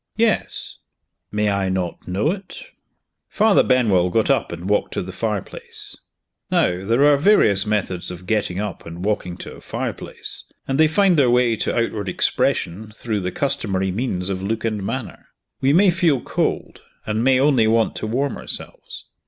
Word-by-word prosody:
"Yes." 225 Hz, -1 st, 0 dB, 0.5 s
"May 105 Hz, 0 st, +1 dB
I 100 Hz, -1 st, 0 dB
not 90 Hz, -2 st, -3 dB
know 100 Hz, -, 0 dB
it?" 195 Hz, -, -7 dB, 0.7 s
Father 215 Hz, -1 st, +4 dB
Benwell 105 Hz, -9 st, +3 dB
got 110 Hz, +4 st, +2 dB
up -, -, 0 dB
and 85 Hz, -, -6 dB
walked 105 Hz, +1 st, 0 dB
to -, -, -1 dB
the 95 Hz, -, -7 dB
fireplace. 105 Hz, 0 st, -1 dB, 0.5 s
Now 90 Hz, +1 st, +1 dB
there 115 Hz, +8 st, +3 dB
are 145 Hz, -1 st, +5 dB
various 115 Hz, -, +4 dB
methods 95 Hz, -4 st, -1 dB
of 90 Hz, 0 st, -8 dB
getting 100 Hz, -3 st, -1 dB
up 105 Hz, -2 st, -4 dB
and 85 Hz, +3 st, -7 dB
walking 90 Hz, -4 st, -2 dB
to -, -, -8 dB
a -, -, -15 dB
fireplace, -, -, -3 dB, 0.2 s
and 135 Hz, +2 st, -1 dB
they 155 Hz, -, +6 dB
find 185 Hz, +2 st, +3 dB
their 130 Hz, -3 st, +4 dB
way 120 Hz, -1 st, +3 dB
to -, -, -1 dB
outward 110 Hz, -4 st, -1 dB
expression 95 Hz, +6 st, 0 dB
through 110 Hz, -3 st, -3 dB
the 90 Hz, -1 st, -3 dB
customary 95 Hz, -8 st, -1 dB
means 95 Hz, -4 st, -2 dB
of 95 Hz, -1 st, -3 dB
look 110 Hz, +4 st, -2 dB
and 110 Hz, -2 st, -1 dB
manner. 120 Hz, +4 st, -5 dB, 0.3 s
We 135 Hz, -, +3 dB
may 185 Hz, +5 st, +5 dB
feel 170 Hz, -6 st, +2 dB
cold, -, -, -2 dB, 0.2 s
and 110 Hz, +1 st, -1 dB
may 130 Hz, 0 st, +4 dB
only 135 Hz, -5 st, +3 dB
want 115 Hz, 0 st, +2 dB
to -, -, -4 dB
warm 135 Hz, +5 st, -1 dB
ourselves. -, -, -8 dB
110 Hz, 170 wpm, -21 LUFS, 95-135 Hz, 0.7 s, they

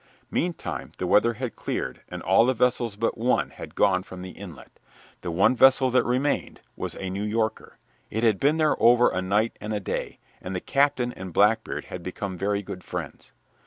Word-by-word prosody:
Meantime 175 Hz, 0 st, -3 dB
the -, -, -2 dB
weather 115 Hz, +3 st, +4 dB
had 125 Hz, +1 st, -5 dB
cleared, -, -, -4 dB
and -, -, -7 dB
all 95 Hz, +5 st, +5 dB
the 130 Hz, -, +2 dB
vessels 120 Hz, -2 st, +1 dB
but 115 Hz, +2 st, -1 dB
one 125 Hz, +2 st, +1 dB
had -, -, -10 dB
gone 95 Hz, -2 st, +3 dB
from 95 Hz, -1 st, -10 dB
the 95 Hz, -, -7 dB
inlet. 90 Hz, -4 st, -12 dB, 0.4 s
The 90 Hz, -, -4 dB
one 95 Hz, +9 st, +3 dB
vessel 130 Hz, 0 st, +5 dB
that 130 Hz, -, +4 dB
remained 130 Hz, +4 st, -1 dB, 0.2 s
was -, -, -5 dB
a 95 Hz, -1 st, -5 dB
New 100 Hz, +2 st, -3 dB
Yorker. 110 Hz, +1 st, -2 dB, 0.3 s
It 110 Hz, +2 st, -2 dB
had 110 Hz, -4 st, +3 dB
been 145 Hz, +3 st, +3 dB
there 155 Hz, -2 st, +2 dB
over 120 Hz, +1 st, +6 dB
a 95 Hz, -, -1 dB
night 105 Hz, +5 st, +1 dB
and 105 Hz, 0 st, -3 dB
a -, -, -1 dB
day, 95 Hz, -, -4 dB, 0.2 s
and 95 Hz, +1 st, -5 dB
the -, -, -1 dB
captain 135 Hz, 0 st, +1 dB
and 95 Hz, -1 st, -8 dB
Blackbeard 105 Hz, +5 st, +2 dB
had 90 Hz, -, -7 dB
become 95 Hz, +2 st, -5 dB
very 100 Hz, +2 st, -1 dB
good 90 Hz, -1 st, -8 dB
friends. -, -, -7 dB
110 Hz, 200 wpm, -25 LUFS, 95-125 Hz, 0.4 s, over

